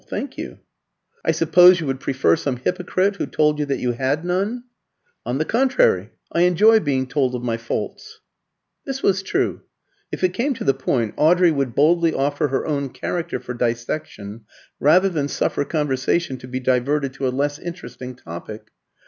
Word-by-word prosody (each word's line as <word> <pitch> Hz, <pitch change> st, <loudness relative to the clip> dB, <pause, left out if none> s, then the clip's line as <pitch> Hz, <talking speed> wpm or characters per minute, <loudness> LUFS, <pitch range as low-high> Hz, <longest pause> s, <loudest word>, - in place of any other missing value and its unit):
"Thank -, -, -5 dB
you." -, -, -7 dB, 0.7 s
"I -, -, -1 dB
suppose 170 Hz, +3 st, +6 dB
you 165 Hz, -, -3 dB
would 135 Hz, -1 st, -2 dB
prefer 130 Hz, -12 st, +2 dB
some 140 Hz, -3 st, -2 dB
hypocrite 185 Hz, +7 st, -1 dB
who -, -, -2 dB
told 150 Hz, -1 st, +1 dB
you 150 Hz, -, -1 dB
that 140 Hz, -, -1 dB
you 125 Hz, -, -1 dB
had 135 Hz, +6 st, -1 dB
none?" 200 Hz, +7 st, -1 dB, 0.6 s
"On 125 Hz, -, -1 dB
the 155 Hz, -, 0 dB
contrary, 230 Hz, -, +2 dB, 0.2 s
I 170 Hz, -, +1 dB
enjoy 210 Hz, +6 st, +5 dB
being 135 Hz, -7 st, 0 dB
told 130 Hz, -1 st, 0 dB
of 120 Hz, -, -5 dB
my 115 Hz, -2 st, -1 dB
faults." 115 Hz, +1 st, -5 dB, 0.6 s
This 270 Hz, -1 st, -5 dB
was 190 Hz, -1 st, +2 dB
true. 195 Hz, -, -1 dB, 0.5 s
If -, -, -5 dB
it 180 Hz, -1 st, +2 dB
came 265 Hz, +6 st, -1 dB
to -, -, -6 dB
the 135 Hz, -, +3 dB
point, 125 Hz, -4 st, -1 dB
Audrey 175 Hz, +2 st, +4 dB
would 140 Hz, -5 st, -2 dB
boldly 165 Hz, +2 st, +3 dB
offer 145 Hz, +2 st, 0 dB
her 135 Hz, -1 st, -2 dB
own 140 Hz, -3 st, -2 dB
character 165 Hz, +7 st, -4 dB
for 125 Hz, -, -7 dB
dissection 115 Hz, -3 st, -4 dB, 0.3 s
rather 175 Hz, +7 st, +5 dB
than 155 Hz, -7 st, -1 dB
suffer 145 Hz, -, -1 dB
conversation 145 Hz, 0 st, -1 dB
to 125 Hz, -, -10 dB
be 130 Hz, 0 st, -4 dB
diverted 130 Hz, +2 st, 0 dB
to 135 Hz, 0 st, -2 dB
a -, -, +1 dB
less 145 Hz, +3 st, -1 dB
interesting 170 Hz, -7 st, -8 dB
topic. 105 Hz, +3 st, -9 dB
145 Hz, 175 wpm, -21 LUFS, 130-175 Hz, 0.7 s, suppose